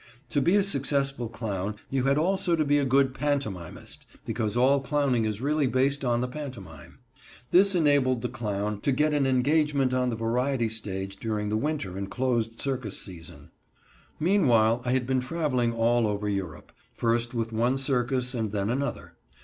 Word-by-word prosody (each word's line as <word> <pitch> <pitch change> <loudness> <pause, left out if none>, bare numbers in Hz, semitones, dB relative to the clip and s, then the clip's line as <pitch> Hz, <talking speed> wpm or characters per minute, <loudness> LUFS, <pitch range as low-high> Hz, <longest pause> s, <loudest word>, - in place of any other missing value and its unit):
To 140 - +1
be 175 +8 +3
a 205 - +4
successful 140 - 0
clown 105 -3 -4 0.2
you 135 -1 0
had 140 +1 +3
also 180 +2 +1
to 155 -2 +1
be 145 +1 +3
a 140 - +1
good 135 0 +3
pantomimist, 135 - -4 0.2
because 110 +1 -2
all 135 +3 +4
clowning 135 -5 +1
is 110 0 -2
really 145 0 +1
based 135 +3 +1
on 120 -2 +1
the 125 - -1
pantomime. 120 - -9 0.5
This 195 +2 +5
enabled 140 -7 +3
the - - +1
clown 105 -2 -3
to 140 - +1
get 150 +3 +2
an 140 -2 +2
engagement 140 0 +2
on 125 -1 +1
the 115 - -2
variety 120 +2 0
stage 100 -3 -5
during 105 -1 -2
the 105 - 0
winter 110 -7 -2
and 100 0 -4
closed 115 0 -1
circus 130 -7 -2
season. 85 -4 -10 0.7
Meanwhile 125 - +3
I 125 - +1
had 130 -1 +1
been 130 +1 +1
traveling 130 -4 0
all 115 0 +2
over 105 0 -2
Europe, 95 -6 -4 0.2
first 115 +1 0
with 115 -1 -2
one 120 +4 +1
circus 130 -1 0
and 110 -4 -2
then 100 +1 -1
another. 140 +3 -3
125 Hz, 175 wpm, -27 LUFS, 110-140 Hz, 0.7 s, This